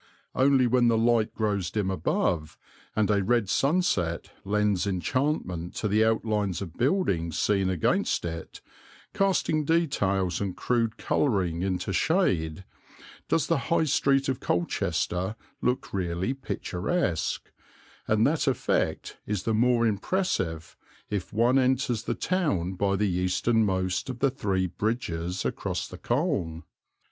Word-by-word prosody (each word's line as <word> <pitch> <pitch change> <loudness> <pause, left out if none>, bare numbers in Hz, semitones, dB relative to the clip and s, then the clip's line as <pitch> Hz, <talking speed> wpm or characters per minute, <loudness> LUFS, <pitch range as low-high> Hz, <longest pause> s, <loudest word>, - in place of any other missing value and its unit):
Only 130 -1 +4
when 120 0 +3
the 115 -1 +3
light 115 -1 +2
grows 100 -5 0
dim 95 0 -1
above 85 -4 -1 0.4
and 110 -1 +2
a 100 -1 +2
red 115 0 +2
sunset 120 - +1
lends 105 -1 +1
enchantment 95 - -1
to 105 - -1
the 105 +2 +3
outlines 105 -5 0
of 90 -5 -6
buildings 105 - 0
seen 95 -2 +2
against 90 -1 +1
it, 80 -1 -6 0.5
casting 180 -5 +1
details 105 - +1
and 95 -3 -3
crude 115 -3 0
colouring 95 - 0
into 95 0 -1
shade, 95 - +1 0.7
does 155 - +2
the 165 - +1
High 170 - +3
Street 140 -2 +2
of 130 -1 -1
Colchester 90 +2 -1 0.3
look 125 +1 -1
really 90 +4 -1
picturesque; 95 - -2 0.6
and 110 +1 +3
that 155 0 +1
effect 130 -4 -1
is 105 -3 -2
the 115 - 0
more 120 +1 +3
impressive 100 - -1 0.4
if 95 -3 -3
one 120 +5 +3
enters 130 -3 +1
the 120 - -1
town 100 - 0
by 100 +1 0
the 105 +2 +1
easternmost 95 +2 +1
of 125 - -4
the 135 +1 +2
three 95 -8 -1
bridges 90 -3 -2
across - - -2
the - - -10
Colne. 120 - -1
105 Hz, 130 wpm, -27 LUFS, 90-130 Hz, 0.7 s, Only